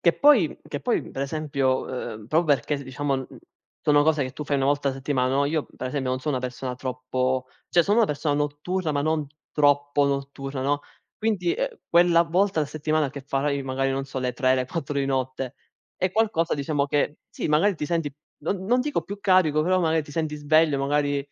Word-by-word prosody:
Che 170 Hz, -, +4 dB
poi 270 Hz, -, +5 dB
che 145 Hz, -, -5 dB
poi 245 Hz, -, +1 dB
per 135 Hz, -, -3 dB
esempio, 140 Hz, -3 st, -1 dB, 0.3 s
ehm, 105 Hz, -1 st, -11 dB
proprio 155 Hz, +2 st, +3 dB
perché 140 Hz, +3 st, -3 dB
diciamo 135 Hz, 0 st, -2 dB, 0.5 s
sono 145 Hz, -1 st, +4 dB
cose 155 Hz, -1 st, +2 dB
che 130 Hz, -, -6 dB
tu 150 Hz, -, -6 dB
fai 140 Hz, 0 st, 0 dB
1 135 Hz, -, +1 dB
volta 145 Hz, 0 st, +2 dB
a 135 Hz, -, 0 dB
settimana, 130 Hz, -1 st, 0 dB
no 140 Hz, +1 st, +3 dB
io 150 Hz, +1 st, 0 dB
per -, -, -4 dB
esempio 130 Hz, -1 st, -2 dB
non 130 Hz, -, 0 dB
sono 145 Hz, 0 st, -1 dB
una 130 Hz, -, -3 dB
persona 125 Hz, 0 st, -4 dB
troppo 130 Hz, 0 st, -2 dB, 0.2 s
cioè, 175 Hz, -, +4 dB
sono 205 Hz, +6 st, +2 dB
una 225 Hz, -, +5 dB
persona 145 Hz, 0 st, -1 dB
notturna, 150 Hz, +4 st, -1 dB
ma 145 Hz, -, 0 dB
non 155 Hz, -1 st, 0 dB, 0.3 s
troppo 145 Hz, -1 st, +3 dB
notturna, 140 Hz, -1 st, -3 dB
no, 145 Hz, +2 st, +1 dB, 0.4 s
quindi, 220 Hz, -, 0 dB
ehm, -, -, -3 dB
quella 170 Hz, 0 st, +5 dB
volta 180 Hz, +2 st, +1 dB
alla 150 Hz, -, -1 dB
settimana 155 Hz, -2 st, 0 dB
che 140 Hz, -, -7 dB
farai 140 Hz, +1 st, -1 dB
magari 135 Hz, 0 st, -1 dB
non 135 Hz, 0 st, -1 dB
sono 130 Hz, -1 st, -5 dB
le 125 Hz, -, 0 dB
3, 130 Hz, 0 st, +2 dB
le 130 Hz, -1 st, 0 dB
4 145 Hz, 0 st, -4 dB
di 135 Hz, -, 0 dB
notte, 130 Hz, -1 st, -2 dB, 0.4 s
è 185 Hz, -, 0 dB
qualcosa 205 Hz, -5 st, +1 dB
diciamo 140 Hz, 0 st, 0 dB
che 145 Hz, +1 st, 0 dB
sì, -, -, -4 dB
magari 165 Hz, +7 st, +3 dB
ti 150 Hz, -, -4 dB
senti, 165 Hz, -3 st, -1 dB, 0.3 s
non 185 Hz, +4 st, -2 dB
non 245 Hz, +5 st, +3 dB
dico 290 Hz, +3 st, -1 dB
più 200 Hz, +1 st, -7 dB
carico, 185 Hz, -6 st, +4 dB
però 185 Hz, +2 st, +2 dB
magari 160 Hz, -2 st, +2 dB
ti 150 Hz, -, -13 dB
senti 155 Hz, -1 st, -2 dB
sveglio, 150 Hz, 0 st, +3 dB
magari, 145 Hz, +1 st, +1 dB
145 Hz, 210 wpm, -25 LUFS, 135-165 Hz, 0.5 s, poi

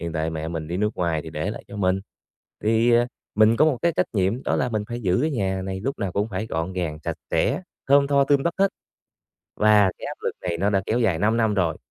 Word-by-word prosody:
hiện 85 Hz, -1 st, -4 dB
tại 80 Hz, 0 st, -1 dB
mẹ 80 Hz, 0 st, -4 dB
mình 80 Hz, -2 st, -5 dB
đi 85 Hz, -, -2 dB
nước 105 Hz, +2 st, +1 dB
ngoài 85 Hz, -3 st, 0 dB
thì 80 Hz, -, -8 dB
để 80 Hz, +5 st, -3 dB
lại -, -, -8 dB
cho 100 Hz, -, -8 dB
mình, 95 Hz, -1 st, +1 dB, 0.6 s
thì, 115 Hz, +2 st, +3 dB
à, 120 Hz, +1 st, +4 dB, 0.3 s
mình 110 Hz, +1 st, +5 dB
có -, -, +5 dB
một 145 Hz, -6 st, +2 dB
cái 170 Hz, -1 st, +3 dB
trách -, -, +2 dB
nhiệm, 100 Hz, +5 st, 0 dB
đó -, -, 0 dB
là 125 Hz, -, 0 dB
mình 110 Hz, -3 st, -1 dB
phải 120 Hz, 0 st, -4 dB
giữ 90 Hz, -2 st, +2 dB
cái 155 Hz, -, +1 dB
nhà 95 Hz, -7 st, -1 dB
này 95 Hz, 0 st, -4 dB
lúc 135 Hz, +5 st, -3 dB
nào 100 Hz, -4 st, -2 dB
cũng 105 Hz, +2 st, 0 dB
phải 100 Hz, +2 st, -3 dB
gọn 80 Hz, -1 st, -3 dB
gàng, 85 Hz, -5 st, -3 dB
sạch -, -, -2 dB
sẽ, 185 Hz, -, +1 dB, 0.3 s
thơm 140 Hz, 0 st, +5 dB
tho, 140 Hz, -1 st, +3 dB
tươm 140 Hz, -1 st, +3 dB
tất 170 Hz, -, 0 dB
hết, 195 Hz, 0 st, +4 dB, 0.9 s
và 105 Hz, -2 st, +5 dB
cái -, -, -6 dB
áp -, -, -5 dB
lực -, -, -1 dB
này 85 Hz, -2 st, -2 dB
nó 100 Hz, +4 st, +1 dB
đã 95 Hz, -1 st, +1 dB
kéo 115 Hz, -, +1 dB
dài 105 Hz, -9 st, +2 dB
5 110 Hz, +5 st, +2 dB
năm 110 Hz, -2 st, +2 dB
rồi. 85 Hz, -5 st, +1 dB
100 Hz, 265 wpm, -24 LUFS, 90-120 Hz, 0.9 s, mình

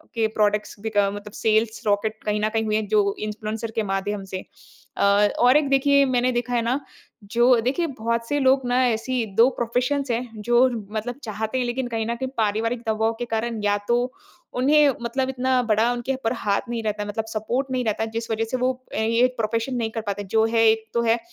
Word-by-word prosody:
के 225 Hz, -1 st, +2 dB
प्रोडक्ट्स 210 Hz, 0 st, +1 dB
बिक 215 Hz, -1 st, -4 dB
मतलब 205 Hz, +1 st, 0 dB
सेल्स 220 Hz, 0 st, +2 dB
रॉकेट 215 Hz, +2 st, 0 dB
कहीं 210 Hz, 0 st, 0 dB
न 215 Hz, -, +1 dB
कहीं 225 Hz, 0 st, 0 dB
हुए 215 Hz, 0 st, 0 dB
हैं 215 Hz, -1 st, -2 dB
जो 205 Hz, -1 st, +2 dB
इन्फ्लुएंसर 215 Hz, +1 st, -4 dB
के 220 Hz, -, +1 dB
माध्यम 200 Hz, +1 st, -2 dB
से। 185 Hz, -, -5 dB, 0.5 s
अ, -, -, +1 dB, 0.4 s
और 250 Hz, +4 st, +6 dB
एक 295 Hz, -2 st, +1 dB
देखिए 280 Hz, +1 st, +4 dB
मैंने 255 Hz, -1 st, +1 dB
देखा 245 Hz, 0 st, -2 dB
है 235 Hz, -, +2 dB
ना, 250 Hz, +5 st, 0 dB, 0.4 s
जो 240 Hz, +3 st, +3 dB
देखिए 280 Hz, +8 st, 0 dB
बहुत 230 Hz, -3 st, -2 dB
से 290 Hz, 0 st, 0 dB
लोग 265 Hz, 0 st, +4 dB
ना 250 Hz, +1 st, +2 dB
ऐसी 235 Hz, +1 st, -1 dB
2 235 Hz, +3 st, +6 dB
प्रोफेशंस 250 Hz, +4 st, 0 dB
हैं 230 Hz, -2 st, -4 dB
जो 240 Hz, +3 st, +4 dB, 0.2 s
मतलब 240 Hz, +5 st, -4 dB
चाहते 220 Hz, +3 st, -3 dB
हैं 250 Hz, -, 0 dB
लेकिन 245 Hz, +1 st, -2 dB
कहीं 225 Hz, -1 st, -2 dB
न 235 Hz, -, -1 dB
कहीं 260 Hz, +2 st, -3 dB
पारिवारिक 225 Hz, +2 st, 0 dB
दबाव 220 Hz, +1 st, +1 dB
के 240 Hz, -, -2 dB
कारण 225 Hz, -1 st, -2 dB
या 205 Hz, 0 st, +2 dB
तो 240 Hz, -, +3 dB, 0.6 s
उन्हें 290 Hz, +3 st, +5 dB
मतलब 260 Hz, +3 st, -1 dB
इतना 255 Hz, 0 st, +1 dB
बड़ा 225 Hz, +1 st, +2 dB
उनके 245 Hz, +2 st, -2 dB
ऊपर 255 Hz, -2 st, -2 dB
हाथ 205 Hz, -4 st, 0 dB
नहीं 230 Hz, -1 st, -3 dB
रहता 210 Hz, -1 st, -2 dB
मतलब 215 Hz, +2 st, -3 dB
सपोर्ट 230 Hz, +5 st, -2 dB
नहीं 255 Hz, -1 st, 0 dB
रहता, 220 Hz, +1 st, 0 dB
जिस 225 Hz, +1 st, -5 dB
वजह 225 Hz, +1 st, 0 dB
से 255 Hz, -, 0 dB
वो 255 Hz, +1 st, +1 dB, 0.2 s
ये 230 Hz, +3 st, +3 dB
प्रोफेशन 230 Hz, +3 st, -1 dB
नहीं 225 Hz, -2 st, -1 dB
कर 225 Hz, -, -3 dB
पाते 205 Hz, -1 st, -4 dB
जो 220 Hz, 0 st, +5 dB
है 225 Hz, -1 st, +4 dB
एक 220 Hz, 0 st, +1 dB
तो 235 Hz, -, +3 dB
है, 230 Hz, +1 st, +2 dB
230 Hz, 210 wpm, -23 LUFS, 215-250 Hz, 0.6 s, और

